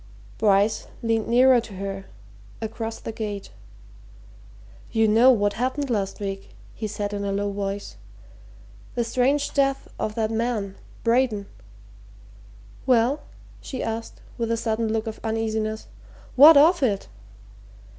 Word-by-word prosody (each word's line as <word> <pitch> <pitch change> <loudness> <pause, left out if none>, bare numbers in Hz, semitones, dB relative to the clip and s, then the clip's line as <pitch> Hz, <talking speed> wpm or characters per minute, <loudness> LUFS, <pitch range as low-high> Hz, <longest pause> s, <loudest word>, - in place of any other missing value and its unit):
Bryce 205 0 +2 0.2
leaned 225 -1 0
nearer 250 +1 +5
to 220 -3 -11
her 195 0 -5 0.5
across 225 0 -5
the - - -6
gate. 210 -3 -5 1.4
"You 225 -1 +3
know 225 +4 +6
what 205 -5 +3
happened 260 +3 -2
last 195 -3 -1
week," 195 -1 -6 0.2
he 220 - -4
said 205 0 -4
in 200 0 -3
a 200 - -1
low 200 +1 -1
voice. 200 - -4 1.0
"The 240 - +1
strange 265 +5 +1
death 275 -1 +1
of 215 - -2
that 220 -1 0
man 225 -4 -1 0.3
Braden." 230 -3 +2 1.4
"Well?" 255 +4 +3 0.4
she 260 - -5
asked, 225 0 -5 0.2
with 230 -1 -1
a 230 - +1
sudden 225 -1 -1
look 220 0 -1
of 220 -1 -6
uneasiness. 220 -1 -2 0.5
"What 295 +4 +9
of 330 +4 +6
it?" 205 -7 0
225 Hz, 130 wpm, -24 LUFS, 205-245 Hz, 1.4 s, What